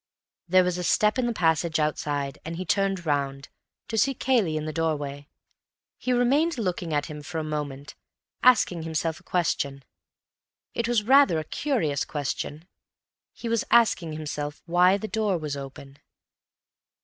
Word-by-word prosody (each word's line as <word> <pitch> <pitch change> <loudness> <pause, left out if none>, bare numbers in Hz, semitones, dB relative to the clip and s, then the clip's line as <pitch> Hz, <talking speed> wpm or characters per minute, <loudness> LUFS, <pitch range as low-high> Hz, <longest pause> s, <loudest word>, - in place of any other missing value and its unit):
There 185 +1 +5
was 180 0 -1
a - - -3
step 210 +7 +2
in 245 - +1
the - - 0
passage 165 -4 +1
outside, 145 -2 -1
and 165 +1 -5
he 185 +2 -5
turned 195 -1 0
round, 140 -2 -1 0.4
to 225 - -1
see 270 +5 +2
Cayley 225 -12 +1
in 155 - -3
the 155 - -4
doorway. 145 -3 -2 0.7
He 255 - -1
remained 270 +7 +2
looking 180 -6 -2
at 145 -1 0
him 150 -2 -8
for 160 +3 -6
a 160 - -1
moment, 145 -2 -5 0.5
asking 220 -9 +4
himself 160 0 -2
a - - -23
question. 140 -6 -1 0.9
It 235 - -1
was 235 -3 +2
rather 270 - +5
a 155 - -2
curious 160 - -1
question. 150 +2 -4 0.6
He 235 - -8
was 230 -1 +1
asking 190 -9 +3
himself 150 -1 -5
why 180 +3 +4
the 220 - -5
door 215 -4 0
was 150 -3 -4
open. 135 0 -9
165 Hz, 160 wpm, -26 LUFS, 150-210 Hz, 0.9 s, There